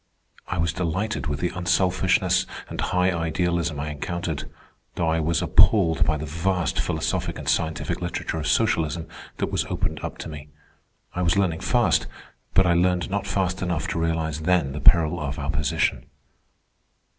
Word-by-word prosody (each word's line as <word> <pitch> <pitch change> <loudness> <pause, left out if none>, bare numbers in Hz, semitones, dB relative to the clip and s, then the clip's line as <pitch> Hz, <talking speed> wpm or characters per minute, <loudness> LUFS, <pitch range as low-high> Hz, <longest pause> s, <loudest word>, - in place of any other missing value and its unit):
I - - -3
was 80 0 +1
delighted 95 +4 -2
with 75 0 -2
the 90 - +1
unselfishness 90 +1 +2 0.2
and - - -5
high 90 0 +1
idealism 85 -1 -1
I 75 +1 -3
encountered, 85 +1 -4 0.5
though 85 - 0
I 80 0 +2
was 80 +1 +1
appalled 85 -7 +4
by 75 - +1
the 75 - -5
vast 85 +3 -1
philosophic - - -1
and - - -8
scientific 80 -1 -1
literature 80 - -3
of 80 - -3
socialism 80 +2 +1 0.3
that - - -2
was - - 0
opened - - -2
up - - -5
to - - -6
me. 75 -1 -9 0.6
I 90 - -2
was 85 +1 +2
learning 90 -5 +1
fast, - - +2 0.5
but 95 - +6
I 85 - +4
learned 90 +1 +1
not 100 0 -1
fast 95 -2 -1
enough 85 -4 -1
to - - -2
realize 80 -1 -1
then 85 -4 +2
the 75 +1 -5
peril 80 +1 +5
of 70 -1 -4
our 70 0 -2
position. 75 0 0
85 Hz, 170 wpm, -24 LUFS, 80-90 Hz, 0.6 s, but